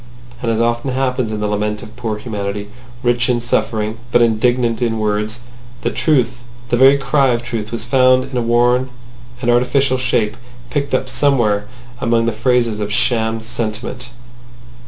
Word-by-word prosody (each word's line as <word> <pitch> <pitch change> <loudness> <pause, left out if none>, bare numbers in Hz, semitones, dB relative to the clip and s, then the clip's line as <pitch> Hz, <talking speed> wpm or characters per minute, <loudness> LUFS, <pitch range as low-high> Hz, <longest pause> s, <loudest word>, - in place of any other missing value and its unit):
And, 115 - -1
as 115 -1 +1
often 120 +3 0
happens 130 -3 0
in 105 -1 -3
the 105 - 0
lament 105 0 -2
of 110 - -12
poor 115 -3 -3
humanity, 105 -2 -4 0.3
rich 120 +1 +2
in 120 -1 +2
suffering 110 -2 -1
but 120 - +5
indigent 115 +1 +1
in 115 -2 0
words, 105 +2 -1 0.4
the - - 0
truth—the 120 -3 -1
very 135 +3 +6
cry 135 +1 +2
of 120 -2 0
truth—was 115 -1 -4
found 130 +1 +4
in - - -6
a 125 - +1
worn 120 +2 +2 0.5
and 120 - +3
artificial 130 +2 +2
shape 115 -4 0 0.4
picked 140 -2 0
up 130 - -1
somewhere 120 -7 +1 0.3
among 115 -1 +2
the 115 - +1
phrases 115 -1 +1
of 105 0 -3
sham 110 0 +1
sentiment. 120 +2 -4
120 Hz, 155 wpm, -18 LUFS, 110-125 Hz, 0.5 s, very